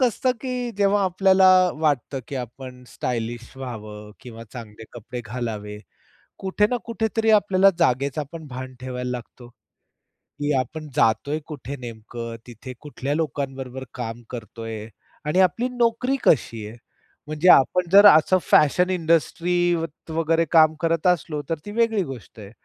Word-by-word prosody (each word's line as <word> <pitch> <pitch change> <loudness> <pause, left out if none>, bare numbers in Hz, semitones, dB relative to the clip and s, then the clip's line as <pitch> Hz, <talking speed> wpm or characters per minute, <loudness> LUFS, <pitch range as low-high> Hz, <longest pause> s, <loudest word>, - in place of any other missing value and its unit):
कसं 255 +1 +2
की 250 -2 -3
जेव्हा 200 0 +3
आपल्याला 190 +1 +4 0.3
वाटतं, 145 -3 0
की 140 - -6
आपण 125 +1 -8
स्टायलिश 120 0 -4
व्हावं 105 -5 -8
किंवा 115 -2 -10
चांगले 110 -3 -10
कपडे 120 +1 -7
घालावे, 105 -3 -5 0.6
कुठे 195 +2 +1
ना 245 - +1
कुठेतरी 225 -1 0
आपल्याला 195 -2 +5
जागेचापण 145 +2 -1
भान 130 0 -7
ठेवायला 125 -1 -4
लागतो. 120 0 -8 0.9
की 145 +1 0
आपण 150 +5 -4
जातोय 140 +7 +2
कुठे 140 -2 -7
नेमकं, 115 0 -7
तिथे 120 +2 -9
कुठल्या 145 -1 -4
लोकांबरोबर 135 -4 -4
काम 120 -1 -6
करतोय 115 -2 -7 0.4
आणि 165 +5 +1
आपली 225 +7 +2
नोकरी 245 +2 +1
कशी 115 -6 +2
आहे. 115 +3 -11 0.5
म्हणजे 155 +4 +2
आपण 175 +6 +4
जर 200 +1 +8
असं 170 +2 +6
फॅशन 180 +5 +3
इंडस्ट्रीत 170 -1 0
वगैरे 165 +1 +1
काम 160 -2 +6
करत 165 +1 +1
असलो, 160 -4 0
तर 165 - +1
ती 205 - -6
वेगळी 225 -2 +1
गोष्ट 130 -7 -10
आहे, 100 -1 -10
145 Hz, 135 wpm, -23 LUFS, 120-180 Hz, 0.9 s, जर